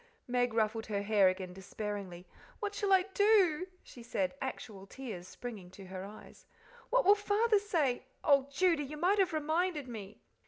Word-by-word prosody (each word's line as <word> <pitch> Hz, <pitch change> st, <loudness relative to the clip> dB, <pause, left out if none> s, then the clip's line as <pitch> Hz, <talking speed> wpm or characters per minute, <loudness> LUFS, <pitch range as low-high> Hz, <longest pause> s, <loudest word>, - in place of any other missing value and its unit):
Meg 245 Hz, 0 st, +1 dB
ruffled 220 Hz, 0 st, 0 dB
her 200 Hz, -2 st, -2 dB
hair 205 Hz, -2 st, +4 dB
again 185 Hz, -1 st, -4 dB
despairingly. 195 Hz, -1 st, -6 dB, 0.3 s
"What 415 Hz, -2 st, -3 dB
shall 410 Hz, -1 st, -1 dB
I 380 Hz, -1 st, +6 dB
do?" 380 Hz, -5 st, +4 dB, 0.2 s
she 245 Hz, -, -13 dB
said, 270 Hz, +4 st, -2 dB
actual 215 Hz, -7 st, -6 dB
tears 210 Hz, -8 st, -7 dB
springing 210 Hz, -5 st, -8 dB
to 195 Hz, -, -10 dB
her 185 Hz, 0 st, -7 dB
eyes. 205 Hz, +2 st, -12 dB, 0.4 s
"What -, -, +3 dB
will 400 Hz, -, +8 dB
Father 415 Hz, +1 st, +2 dB
say? 305 Hz, -, 0 dB, 0.2 s
Oh, 280 Hz, -2 st, +4 dB
Judy, 335 Hz, -1 st, +2 dB
you 300 Hz, +3 st, -7 dB
might 370 Hz, +6 st, +2 dB
have 375 Hz, -2 st, +3 dB
reminded 315 Hz, -1 st, 0 dB
me." 215 Hz, -4 st, -9 dB
260 Hz, 165 wpm, -32 LUFS, -, 0.4 s, will